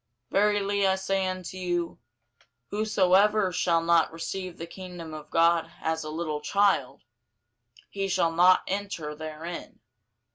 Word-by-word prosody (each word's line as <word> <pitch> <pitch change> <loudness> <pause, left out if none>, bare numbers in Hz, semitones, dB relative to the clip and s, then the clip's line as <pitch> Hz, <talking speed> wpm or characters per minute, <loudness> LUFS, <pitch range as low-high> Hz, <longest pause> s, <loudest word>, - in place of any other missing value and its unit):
Verily 200 -1 +2
I 190 - +3
say 190 0 -1
unto 185 0 -5
you, 175 -2 -2 0.7
Whosoever 205 -1 +3
shall 170 -2 +2
not 170 -1 +3
receive 180 +2 -5
the 165 - -6
kingdom 175 -2 -9
of 155 -1 -9
God 165 0 +3
as 160 0 -2
a 155 - -6
little 155 -1 -3
child, 200 +6 +1 0.8
he 195 -1 -3
shall 180 -3 +1
not 180 +3 +5
enter 190 -6 -3
therein. 155 +2 -7
180 Hz, 130 wpm, -27 LUFS, 165-195 Hz, 0.8 s, not